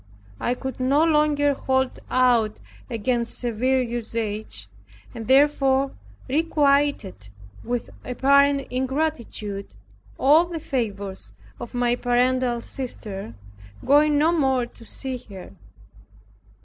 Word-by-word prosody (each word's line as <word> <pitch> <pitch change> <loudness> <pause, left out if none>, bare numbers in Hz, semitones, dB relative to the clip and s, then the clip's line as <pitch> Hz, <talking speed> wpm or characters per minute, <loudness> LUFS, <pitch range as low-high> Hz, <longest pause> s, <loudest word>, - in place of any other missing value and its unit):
I 245 - 0
could 265 +1 -6
no 275 +4 +3
longer 300 -2 +3
hold 265 -1 -1
out 240 -4 +2 0.3
against 235 +1 -1
severe 250 +2 0
usage, 220 - -4 0.5
and 225 -1 -7
therefore 270 0 +3 0.4
requited 280 - +1 0.3
with 245 0 -3
apparent 280 +2 +3
ingratitude 255 -7 -3 0.4
all 305 +5 +5
the 340 -2 -5
favors 205 -10 -4 0.3
of 240 - -8
my 245 0 +2
paternal 245 0 +1
sister, 205 - -6 0.5
going 295 +2 +4
no 310 +3 +4
more 265 -7 +2
to 235 - -16
see 260 +3 -3
her. 190 -2 -10
255 Hz, 100 wpm, -24 LUFS, 230-280 Hz, 0.5 s, all